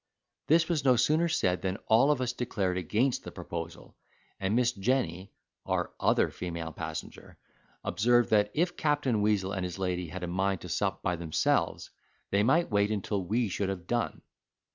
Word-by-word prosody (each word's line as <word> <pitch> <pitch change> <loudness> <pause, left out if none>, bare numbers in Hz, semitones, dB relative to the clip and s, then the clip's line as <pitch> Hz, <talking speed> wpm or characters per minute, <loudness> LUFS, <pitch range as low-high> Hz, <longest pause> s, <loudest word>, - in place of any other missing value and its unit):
This 165 +2 +4
was 160 -5 0
no 130 -2 +5
sooner 155 +8 +3
said 90 - +1
than 95 0 -2
all 120 +6 +5
of 145 -3 +2
us 125 -1 -1
declared 105 -7 -1
against 110 +8 0
the - - -7
proposal, 85 0 -7 0.4
and 95 +3 0
Miss 120 0 +3
Jenny 100 -5 -1 0.3
(our - - -1
other - - +2
female 85 -2 -5
passenger), - - -7 0.5
observed 120 +5 +2
that, 105 -1 +4
if 175 +3 +1
Captain 145 -7 +1
Weazel 105 -2 +1
and 95 - -2
his 90 0 -4
lady 90 -2 -2
had 90 +3 -7
a - - -2
mind 95 +2 0
to 90 - -8
sup 95 +2 -1
by 90 -1 0
themselves, 80 -2 0 0.4
they 100 - +3
might 145 +9 +3
wait 100 0 +3
until 100 -2 -2
we 110 +6 0
should 100 0 -2
have 90 -3 -5
done. 120 +3 -2
105 Hz, 175 wpm, -29 LUFS, 90-125 Hz, 0.5 s, no